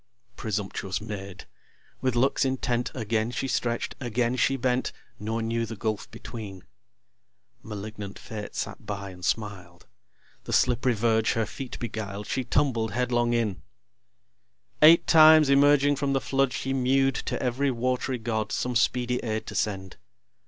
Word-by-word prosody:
Presumptuous 100 -2 -3
Maid! 100 -3 -7 0.6
with 130 -2 0
looks 130 +3 +2
intent 125 -2 0
Again 110 -1 -1
she 130 +2 -3
stretch'd, 120 -2 -1
again 120 0 0
she 135 +2 +2
bent, 125 0 0 0.3
Nor 110 +2 -2
knew 115 +1 -1
the 115 0 -5
gulf 110 0 -3
between. 100 -5 -8 1.0
(Malignant 105 -1 -7
Fate 105 -2 -8
sat - - -4
by, 100 -1 -5
and 90 -1 -13
smiled.) 90 -5 -3 0.6
The - - -4
slipp'ry 125 0 +3
verge 110 0 +2
her 115 -1 0
feet 130 +4 -7
beguiled, 105 -3 -5
She 130 - -2
tumbled 120 -5 0
headlong 120 -1 +1
in. 105 -7 -1 1.2
Eight 160 +2 +8
times 155 -2 +7
emerging 145 0 +5
from 140 0 0
the 135 - +2
flood 135 -1 +1
She 135 +2 -2
mew'd 135 +1 +2
to - - -1
ev'ry 130 +2 0
wat'ry 125 +1 -1
god, 110 -2 -2
Some 125 0 -2
speedy 125 +1 +1
aid 110 -2 -3
to - - -7
send. 95 -3 -2
120 Hz, 145 wpm, -27 LUFS, 105-130 Hz, 1.2 s, Eight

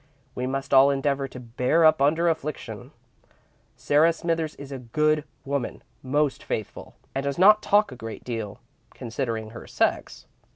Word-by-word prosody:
We 125 0 -3
must 135 +1 -3
all 135 +1 +7
endeavour 140 0 0
to 130 - -10
bear 125 +7 +1
up 155 -2 +5
under 160 +5 +3
affliction. 155 -3 -3 0.9
Sarah 155 +3 +3
Smithers 165 -2 -2
is 140 -1 -10
a 135 - -5
good 150 +5 +1 0.2
woman, 140 -3 -3 0.2
most 145 0 0
faithful, 110 - -5 0.2
and 135 - -2
does 140 -1 -2
not 210 +4 +6
talk 205 -5 +3
a - - -8
great 115 -2 -8
deal, 115 -4 -5 0.4
considering 115 -2 -4
her 115 - -10
sex. - - -1
140 Hz, 155 wpm, -25 LUFS, 125-155 Hz, 0.9 s, all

